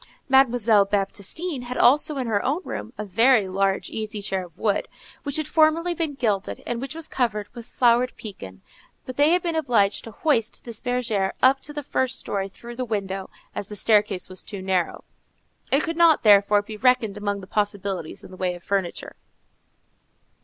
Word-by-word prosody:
Mademoiselle 245 Hz, -6 st, +4 dB
Baptistine 205 Hz, -, -2 dB
had 250 Hz, +1 st, -5 dB
also 290 Hz, +3 st, +4 dB
in 260 Hz, -, -2 dB
her 210 Hz, -3 st, 0 dB
own 285 Hz, +6 st, 0 dB
room 225 Hz, -, -6 dB
a 210 Hz, -, -4 dB
very 225 Hz, +2 st, +4 dB
large 195 Hz, +1 st, 0 dB
easy 215 Hz, -1 st, -4 dB
chair 190 Hz, -2 st, -2 dB
of 170 Hz, -3 st, -15 dB
wood, 205 Hz, -3 st, 0 dB, 0.3 s
which 285 Hz, 0 st, -1 dB
had 310 Hz, -, -1 dB
formerly 320 Hz, +3 st, +3 dB
been 320 Hz, -4 st, -2 dB
gilded, 210 Hz, -7 st, -2 dB
and 240 Hz, 0 st, -3 dB
which 270 Hz, +3 st, -5 dB
was 325 Hz, -1 st, -4 dB
covered 210 Hz, -5 st, -1 dB
with 235 Hz, -2 st, -10 dB
flowered 245 Hz, 0 st, +3 dB
pekin; 95 Hz, -, -9 dB, 0.4 s
but 255 Hz, -, -7 dB
they 290 Hz, +3 st, +4 dB
had 355 Hz, +1 st, +3 dB
been 340 Hz, -2 st, -1 dB
obliged 230 Hz, -10 st, +2 dB
to -, -, -8 dB
hoist 230 Hz, -1 st, 0 dB
this 235 Hz, -3 st, -6 dB
bergère 235 Hz, -6 st, -1 dB
up 265 Hz, +1 st, +6 dB
to 295 Hz, -, -6 dB
the 295 Hz, 0 st, -5 dB
first 260 Hz, 0 st, -1 dB
story 195 Hz, -1 st, -3 dB
through 235 Hz, +4 st, -11 dB
the 255 Hz, -, -3 dB
window, 195 Hz, -4 st, -3 dB, 0.2 s
as 200 Hz, -, -5 dB
the 210 Hz, -, -8 dB
staircase 205 Hz, -2 st, +2 dB
was 185 Hz, 0 st, -6 dB
too 200 Hz, -, -8 dB
narrow; 185 Hz, -2 st, -1 dB, 0.7 s
it 275 Hz, +3 st, +4 dB
could 330 Hz, -1 st, -3 dB
not, 335 Hz, -2 st, +5 dB
therefore, 205 Hz, -1 st, +5 dB
be 215 Hz, +1 st, -8 dB
reckoned 250 Hz, -3 st, +2 dB
among 205 Hz, -1 st, -2 dB
the -, -, -9 dB
possibilities 200 Hz, -4 st, -2 dB
in -, -, -12 dB
the 185 Hz, -, -11 dB
way 180 Hz, -1 st, -1 dB
of 175 Hz, -, -13 dB
furniture. 195 Hz, -3 st, -3 dB
220 Hz, 190 wpm, -24 LUFS, 200-265 Hz, 0.7 s, up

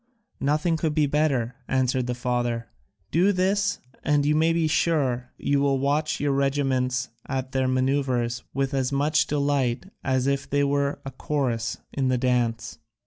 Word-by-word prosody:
"Nothing 155 Hz, +4 st, +1 dB
could 155 Hz, -2 st, -1 dB
be 155 Hz, -2 st, +3 dB
better," 135 Hz, -5 st, 0 dB
answered 130 Hz, -1 st, +1 dB
the 125 Hz, -, -1 dB
father. 120 Hz, -2 st, -1 dB, 0.4 s
"Do 185 Hz, +5 st, +4 dB
this, 200 Hz, +2 st, +1 dB, 0.3 s
and 145 Hz, -2 st, +2 dB
you 150 Hz, -, +3 dB
may 160 Hz, +2 st, +3 dB
be 165 Hz, -1 st, +1 dB
sure 135 Hz, -6 st, +1 dB
you 140 Hz, 0 st, +1 dB
will 140 Hz, -1 st, +2 dB
watch 145 Hz, +3 st, 0 dB
your 145 Hz, 0 st, +1 dB
regiments 135 Hz, -2 st, 0 dB, 0.2 s
at 130 Hz, -1 st, -3 dB
their 130 Hz, -1 st, +1 dB
manoeuvres 130 Hz, -2 st, 0 dB
with 135 Hz, +1 st, -1 dB
as 135 Hz, -1 st, 0 dB
much 150 Hz, +2 st, +2 dB
delight 140 Hz, -2 st, 0 dB, 0.2 s
as 130 Hz, -1 st, +1 dB
if 140 Hz, 0 st, -1 dB
they 145 Hz, 0 st, +2 dB
were 140 Hz, 0 st, 0 dB
a 135 Hz, -, -5 dB
chorus 125 Hz, -5 st, -2 dB, 0.2 s
in 135 Hz, -2 st, 0 dB
the 130 Hz, -1 st, +2 dB
dance." 120 Hz, -2 st, 0 dB
135 Hz, 160 wpm, -25 LUFS, 125-145 Hz, 0.4 s, Do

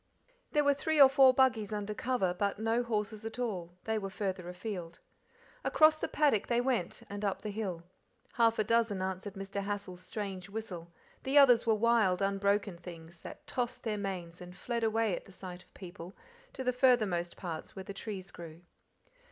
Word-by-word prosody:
There 295 Hz, -, +4 dB
were 285 Hz, 0 st, +5 dB
three 310 Hz, +2 st, 0 dB
or 275 Hz, -, +11 dB
four 265 Hz, -1 st, +7 dB
buggies 250 Hz, -5 st, +2 dB
under 210 Hz, 0 st, -3 dB
cover, 230 Hz, -6 st, 0 dB
but 200 Hz, +2 st, -1 dB
no 225 Hz, +2 st, +1 dB
horses 215 Hz, -2 st, -2 dB
at 225 Hz, +1 st, -6 dB
all, 180 Hz, -8 st, -3 dB
they 220 Hz, -1 st, 0 dB
were 195 Hz, -1 st, -4 dB
farther 190 Hz, -2 st, -3 dB
afield. 180 Hz, -2 st, -6 dB, 0.7 s
Across 310 Hz, 0 st, +5 dB
the -, -, -1 dB
paddock 285 Hz, -9 st, +2 dB
they 240 Hz, 0 st, +2 dB
went, 245 Hz, -8 st, -1 dB
and 205 Hz, +1 st, -6 dB
up 200 Hz, -2 st, -1 dB
the 210 Hz, -, -3 dB
hill. 195 Hz, -5 st, -4 dB, 0.5 s
Half 230 Hz, -1 st, +3 dB
a 215 Hz, -, +3 dB
dozen 225 Hz, -3 st, +1 dB
answered 190 Hz, +2 st, -4 dB
Mr. 195 Hz, +1 st, -4 dB
Hassal's 200 Hz, -3 st, -4 dB
strange 195 Hz, -2 st, -5 dB
whistle; 185 Hz, -6 st, -6 dB, 0.3 s
the 270 Hz, +2 st, +1 dB
others 245 Hz, -5 st, +7 dB
were 220 Hz, -, +5 dB
wild, 215 Hz, -5 st, +3 dB
unbroken 200 Hz, -1 st, +1 dB
things, 170 Hz, -1 st, -10 dB
that -, -, -10 dB
tossed 245 Hz, -1 st, -3 dB
their 215 Hz, -2 st, -2 dB
manes 180 Hz, -4 st, -5 dB
and 180 Hz, 0 st, -10 dB
fled 235 Hz, +1 st, -2 dB
away 220 Hz, -3 st, +2 dB
at -, -, -8 dB
the -, -, -15 dB
sight 185 Hz, -1 st, -8 dB
of -, -, -33 dB
people 180 Hz, 0 st, -9 dB, 0.4 s
to 265 Hz, -, -5 dB
the 250 Hz, 0 st, +1 dB
farthermost 215 Hz, -10 st, +2 dB
parts 165 Hz, -4 st, -6 dB
where 190 Hz, -, -6 dB
the 200 Hz, -, -6 dB
trees 195 Hz, -2 st, -6 dB
grew. 165 Hz, -1 st, -10 dB
205 Hz, 185 wpm, -32 LUFS, 185-235 Hz, 0.7 s, or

